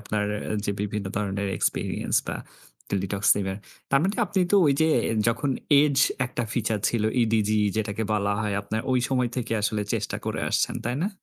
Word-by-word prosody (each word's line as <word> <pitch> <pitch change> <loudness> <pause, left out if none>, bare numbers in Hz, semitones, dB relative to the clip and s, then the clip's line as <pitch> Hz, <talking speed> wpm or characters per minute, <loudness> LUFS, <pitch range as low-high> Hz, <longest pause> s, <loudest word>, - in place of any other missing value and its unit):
আপনার 105 -2 -2 0.2
অ্যা - - -2
যে 100 - 0
বিভিন্ন 105 0 -3
ধরনের 100 -1 -1
এক্সপেরিয়েন্স - - -1
বা - - -2 0.5
টেলিটক 100 0 -2
সিমের। 95 -1 -1 0.3
তার 135 - +5
মানে 195 +3 0
আপনি 200 -2 0
তো - - +7
ওই 145 - +5
যে 160 - +5 0.4
যখন 135 +5 0 0.3
এজ 145 -2 +1 0.3
একটা 125 0 -3
ফিচার 110 -2 0
ছিল। 115 -3 0 0.2
ইডিজি 110 -1 +2 0.2
যেটাকে 110 0 -1
বলা 100 -1 +1
হয় 105 -2 -1
আপনার 110 +2 -2
ওই 125 - +3
সময় 125 -2 +1
থেকে 125 -2 -2 0.4
চেষ্টা - - -2
করে - - -2
আসছেন, - - +1
তাই 120 +2 -1
না? 195 - +1
110 Hz, 175 wpm, -25 LUFS, 100-125 Hz, 0.5 s, তো